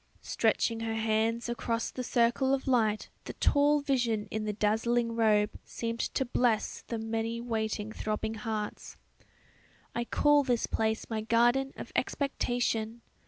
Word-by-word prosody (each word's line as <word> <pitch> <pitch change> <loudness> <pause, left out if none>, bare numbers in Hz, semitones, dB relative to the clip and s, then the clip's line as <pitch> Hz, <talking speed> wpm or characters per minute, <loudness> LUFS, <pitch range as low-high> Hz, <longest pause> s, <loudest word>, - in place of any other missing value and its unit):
Stretching 230 -1 +1
her 225 0 -2
hands 225 +1 0
across 230 -1 -2
the 255 - -4
circle 250 +3 +2
of 270 - -7
light 220 -5 +2 0.2
the - - -6
tall 290 +1 +3
vision 240 -7 0
in 215 0 -2
the 210 - -1
dazzling 230 +3 +1
robe 210 -2 +3
seemed 230 0 -4
to 265 - -1
bless 240 -3 0
the 230 - -5
many 225 +1 -2
waiting 220 -2 -2
throbbing 215 0 -3
hearts. 215 -1 -5 1.0
"I 235 - -2
call 295 +3 +4
this 245 -3 +1
place 220 0 -1
my 220 -1 -2
garden 240 +4 +3
of - - -8
expectation! 240 -4 -1
230 Hz, 140 wpm, -30 LUFS, 220-240 Hz, 1.0 s, call